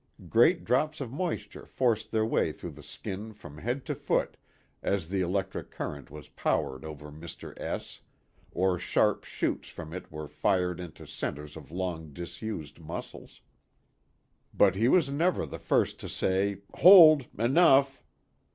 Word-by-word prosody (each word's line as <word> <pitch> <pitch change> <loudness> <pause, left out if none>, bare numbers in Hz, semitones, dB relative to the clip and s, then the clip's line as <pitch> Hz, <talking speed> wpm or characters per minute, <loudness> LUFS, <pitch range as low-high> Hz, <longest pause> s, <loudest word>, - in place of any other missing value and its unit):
Great 165 +10 +4
drops 150 +6 +1
of 130 -5 -5
moisture 170 +5 -4
forced 115 -4 0
their 110 0 +2
way 110 - +1
through - - -8
the - - -13
skin 105 +4 -7
from 75 -8 -12
head 120 - -3
to - - -2
foot - - -1 0.5
as 95 -5 -1
the 95 0 0
electric 95 +1 -2
current 70 -2 -6
was 75 -1 -11
poured 65 0 -1
over 75 -1 -9
Mr. 80 +3 -9
S - - -5 0.5
or 90 0 +1
sharp - - +1
shots - - -3
from 80 -1 -9
it 95 - -8
were 75 0 -6
fired 90 +3 0
into 85 -3 -9
centers 75 0 -5
of 75 -4 -11
long 85 -3 -4
disused 85 0 -6
muscles. 80 0 -9 1.1
But 100 -3 +5
he 110 +5 +1
was 165 +1 +4
never 170 +6 +1
the - - -8
first - - +1
to - - -7
say, 100 +1 0
" - - -31
Hold 155 -6 +9
enough 135 +2 +4
95 Hz, 150 wpm, -29 LUFS, 80-130 Hz, 1.1 s, Hold